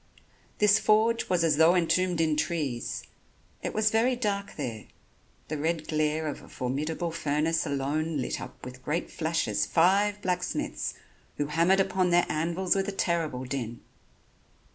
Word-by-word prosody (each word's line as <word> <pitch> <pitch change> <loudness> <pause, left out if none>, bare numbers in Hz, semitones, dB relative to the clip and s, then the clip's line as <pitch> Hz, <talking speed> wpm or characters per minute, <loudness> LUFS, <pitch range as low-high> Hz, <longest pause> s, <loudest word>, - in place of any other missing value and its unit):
This 210 0 +5
forge 225 +2 +2
was 180 -2 +2
as 155 -3 +3
though 165 +3 +6
entombed 180 0 +2
in 160 -2 +2
trees. 150 -7 -2 0.6
It - - -3
was 215 0 +2
very 235 +3 +3
dark 200 -4 -2
there, 120 -7 -5 0.6
the 155 -1 -4
red 160 +1 -1
glare 155 0 0
of 150 - -4
a - - -15
formidable 155 +6 -2
furnace 160 +1 0
alone 145 +3 -1
lit 130 - -2
up - - -10
with 125 0 -10
great 160 +6 -2
flashes 155 -11 0
five 200 +4 +3
blacksmiths, 180 -1 -2 0.4
who 145 - 0
hammered 170 +6 +3
upon 190 -1 +2
their 175 0 +4
anvils 170 +5 0
with 195 0 0
a - - -1
terrible 165 -9 -1
din. 120 -3 -4
165 Hz, 150 wpm, -28 LUFS, 150-185 Hz, 0.6 s, though